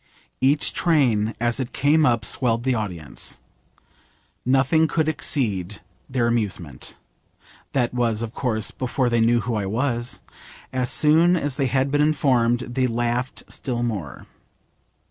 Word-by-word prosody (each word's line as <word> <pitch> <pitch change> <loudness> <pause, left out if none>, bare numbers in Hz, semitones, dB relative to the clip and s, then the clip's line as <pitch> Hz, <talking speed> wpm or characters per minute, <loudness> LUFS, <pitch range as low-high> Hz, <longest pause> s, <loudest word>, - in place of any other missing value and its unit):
Each 140 +3 +3
train 120 -10 +2
as 120 +2 0
it 130 -1 -4
came 150 +3 +3
up 115 -4 +1
swelled 120 -2 +1
the 130 0 +1
audience. 90 -10 -5 1.0
Nothing 135 +5 +3
could 155 0 0
exceed 105 - -1 0.3
their 125 -3 0
amusement. 100 - -2 0.8
That 125 -3 0
was, 115 -2 0
of 115 0 -6
course, 110 -6 -1
before 130 0 -1
they 120 -1 +2
knew 120 +1 +3
who 120 - -3
I 105 -3 -1
was. 120 +2 -1 0.5
As 125 -1 0
soon 165 +4 +5
as 145 -5 -2
they 135 -3 +1
had 135 +1 0
been 145 0 +2
informed 125 -6 +2
they 130 +1 -1
laughed 120 +2 -2
still 120 -3 -4
more. 100 - -4
120 Hz, 140 wpm, -23 LUFS, 115-135 Hz, 1.0 s, soon